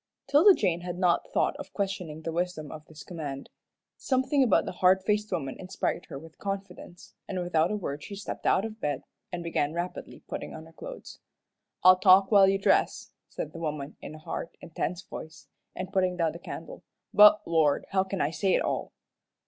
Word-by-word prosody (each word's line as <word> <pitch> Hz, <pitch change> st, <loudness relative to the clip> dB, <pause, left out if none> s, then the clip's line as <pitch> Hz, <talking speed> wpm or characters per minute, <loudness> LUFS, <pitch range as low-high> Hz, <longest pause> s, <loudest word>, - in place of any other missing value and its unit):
'Tilda 310 Hz, +8 st, +6 dB
Jane 175 Hz, -4 st, 0 dB
had 175 Hz, 0 st, -5 dB
not 180 Hz, -2 st, +2 dB
a -, -, -25 dB
thought -, -, +1 dB
of -, -, -9 dB
questioning 180 Hz, -6 st, -3 dB
the 165 Hz, -, -3 dB
wisdom 170 Hz, -3 st, -3 dB
of 155 Hz, -1 st, -9 dB
this 155 Hz, -1 st, -12 dB
command. 145 Hz, -6 st, -7 dB, 0.5 s
Something 265 Hz, +2 st, +1 dB
about 240 Hz, -7 st, +4 dB
the -, -, -4 dB
hard 185 Hz, +1 st, +3 dB
faced 210 Hz, +1 st, 0 dB
woman 140 Hz, -7 st, -3 dB
inspired 185 Hz, -1 st, -3 dB
her -, -, -7 dB
with 160 Hz, +2 st, -13 dB
confidence, 195 Hz, -3 st, -7 dB
and 185 Hz, -, -3 dB
without 175 Hz, -2 st, +1 dB
a 210 Hz, -, -1 dB
word 150 Hz, -8 st, -4 dB
she 200 Hz, -, -7 dB
stepped 200 Hz, -, -5 dB
out 195 Hz, -, +3 dB
of 220 Hz, 0 st, -8 dB
bed, 145 Hz, -2 st, -2 dB, 0.3 s
and 175 Hz, -1 st, -4 dB
began 160 Hz, -3 st, -1 dB
rapidly 175 Hz, +1 st, -5 dB
putting -, -, -6 dB
on 160 Hz, 0 st, -9 dB
her 165 Hz, -, -17 dB
clothes. -, -, -10 dB, 0.6 s
"I'll 185 Hz, 0 st, +8 dB
talk 190 Hz, +1 st, +6 dB
while 195 Hz, -2 st, +7 dB
you 195 Hz, -, +2 dB
dress," 195 Hz, -, +1 dB, 0.2 s
said -, -, -6 dB
the 165 Hz, -, -8 dB
woman, 150 Hz, -2 st, -4 dB
in 155 Hz, -, -8 dB
a -, -, -9 dB
hard, 155 Hz, +1 st, -5 dB
intense 170 Hz, +2 st, -4 dB
voice, 160 Hz, +1 st, -10 dB, 0.3 s
and 185 Hz, +1 st, -6 dB
putting 185 Hz, -2 st, +1 dB
down 165 Hz, -2 st, +1 dB
the 170 Hz, -, -10 dB
candle, -, -, -8 dB, 0.3 s
"but, 210 Hz, 0 st, +8 dB
Lord, 155 Hz, -4 st, +2 dB
how 190 Hz, -1 st, +3 dB
can 190 Hz, 0 st, -4 dB
I 145 Hz, -, +1 dB
say 190 Hz, +2 st, +1 dB
it -, -, +1 dB
all?" -, -, -2 dB
180 Hz, 200 wpm, -28 LUFS, 160-195 Hz, 0.6 s, I'll